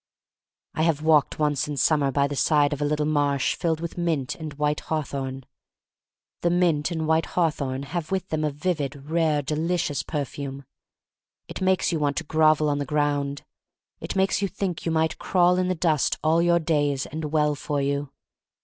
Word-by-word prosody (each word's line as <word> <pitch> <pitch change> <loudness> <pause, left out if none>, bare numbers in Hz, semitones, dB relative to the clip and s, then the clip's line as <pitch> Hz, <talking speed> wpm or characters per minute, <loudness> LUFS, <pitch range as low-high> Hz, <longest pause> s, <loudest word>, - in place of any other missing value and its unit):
I - - -2
have 160 -2 +1
walked 155 -3 +3
once 150 -3 0
in 145 -1 -4
summer 145 -2 +2
by 140 +1 +2
the 145 - -4
side 145 0 +3
of 145 - -5
a - - +1
little 150 0 0
marsh 145 -3 +1
filled 165 -2 -1
with 170 +1 -5
mint 160 -7 -1
and 155 -2 -7
white 150 +1 0
hawthorn. 135 -4 -4 1.0
The 170 - +2
mint 170 -4 +2
and 160 -2 -2
white 160 +1 +2
hawthorn 140 -6 0
have 160 +3 -4
with 190 -1 -2
them 155 -1 -1
a 150 - +1
vivid, 145 -2 -3
rare, 160 -3 +2
delicious 155 +1 -1
perfume. 140 -2 -5 0.8
It - - -7
makes 185 0 +2
you 165 - -1
want 145 -1 0
to 170 - -1
grovel 155 -1 +3
on 145 -1 0
the - - 0
ground 145 -1 -1 0.3
— - - -59
it - - -5
makes 190 +1 +2
you 200 - +1
think 185 -2 -4
'you - - +1
might 160 0 0
crawl 180 -1 +3
in 185 0 +1
the 185 - 0
dust 155 -3 +1
all 160 +2 +3
your 170 0 +4
days, 145 -4 0
and 155 +2 -5
well 150 0 +1
for 145 0 -3
you. 140 0 -1
150 Hz, 190 wpm, -25 LUFS, 145-165 Hz, 1.0 s, your